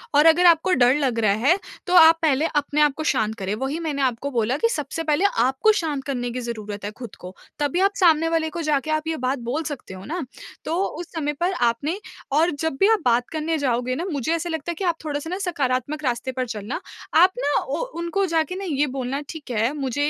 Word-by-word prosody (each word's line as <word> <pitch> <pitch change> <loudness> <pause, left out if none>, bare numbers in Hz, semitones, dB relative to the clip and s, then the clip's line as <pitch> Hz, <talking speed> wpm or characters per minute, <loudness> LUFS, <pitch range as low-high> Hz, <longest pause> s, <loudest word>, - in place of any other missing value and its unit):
और 295 +2 +6
अगर 330 +2 +6
आपको 345 +2 +5
डर 250 +2 +4
लग 260 -6 0
रहा 210 -3 +3
है, 350 +6 +5 0.3
तो 360 - 0
आप 325 -1 +8
पहले 305 -1 +2
अपने 295 +1 +1
आप 295 -2 +4
को 315 - -3
शांत 220 -7 0
करें, 195 -2 -3
वही 270 +7 -3
मैंने 305 -4 -2
आपको 265 +2 -1
बोला 240 +2 0
कि 460 - +2
सबसे 310 - -3
पहले 310 +4 +1
आपको 265 - +3
शांत 300 -7 -2
करने 245 -3 -2
की 250 - -4
ज़रूरत 215 -4 -6
है 205 - -3
ख़ुद 240 -3 -9
को, 180 +1 -10 0.2
तभी 290 +4 0
आप 395 +1 +2
सामने 330 -3 +4
वाले 325 -1 0
को 340 +1 -5
जाके 305 0 0
आप 310 +1 -1
ये 320 - -1
बात 255 +1 -1
बोल 310 +5 -1
सकते 285 -10 -6
हो 185 - -9
ना। 335 +1 -3 0.4
तो 320 - -1
उस 340 +2 -7
समय 295 -2 -1
पर 350 +2 +1
आपने 280 - 0 0.3
और 320 +5 +3
जब 320 -3 -1
भी 395 - +5
आप 430 - +1
बात 245 0 +3
करने 320 0 -1
जाओगे 255 -2 0
ना 340 - -3
मुझे 285 +3 -1
ऐसा 340 +1 -3
लगता 320 +1 -3
है - - -5
कि 385 - -5
आप 340 -2 +2
थोड़ा-सा 295 +1 -3
ना 365 - -2
सकारात्मक 285 -1 -1
रास्ते 250 0 -1
पर 255 0 -2
चलना 215 +3 -4 0.4
आप 365 +3 +7
ना - - +1
ओ - - -2 0.2
उनको 340 +4 0
जाके 330 0 0
ना 390 - -5
ये 295 -4 0
बोलना 265 +2 -3
ठीक 310 -5 -8
है 230 +3 +1
मुझे 270 -4 -3
295 Hz, 235 wpm, -23 LUFS, 255-330 Hz, 0.4 s, आप